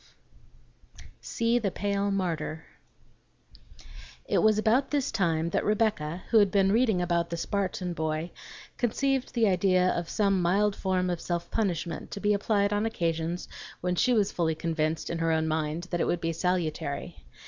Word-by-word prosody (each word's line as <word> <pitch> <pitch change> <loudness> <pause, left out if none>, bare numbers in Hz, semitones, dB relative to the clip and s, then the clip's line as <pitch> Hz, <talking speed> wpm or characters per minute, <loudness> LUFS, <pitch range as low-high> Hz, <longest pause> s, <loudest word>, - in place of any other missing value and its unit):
XII - - -25 0.2
"SEE 230 0 0
THE 210 -4 0
PALE 200 +1 -1
MARTYR" 170 -5 -2 1.6
It - - +1
was 215 -1 +4
about 230 +5 +2
this 285 -3 0
time 165 -3 0
that - - 0
Rebecca, 205 -6 0
who 225 - +7
had 205 -2 +4
been 195 0 +3
reading 220 -5 +2
about 170 -1 0
the 170 - -3
Spartan 185 -1 -2
boy, 160 +1 -2 0.5
conceived 265 +3 0
the 230 -2 +3
idea 185 -1 +3
of 170 -1 -3
some 195 -3 +1
mild 195 +4 +2
form 185 -1 0
of 175 - -3
self 170 -1 -3
punishment 175 -6 -2
to 200 - -6
be 210 +1 +2
applied 200 0 +1
on 205 +2 +1
occasions 170 -3 -2 0.3
when 180 0 0
she 250 +8 +2
was 210 -5 +2
fully 160 -2 0
convinced 160 -1 -2
in 170 - -3
her 165 0 +1
own 160 0 +1
mind 155 +1 -1
that 175 - 0
it - - +1
would 175 - 0
be 165 0 -2
salutary. 155 - -2
180 Hz, 170 wpm, -28 LUFS, 165-205 Hz, 1.6 s, who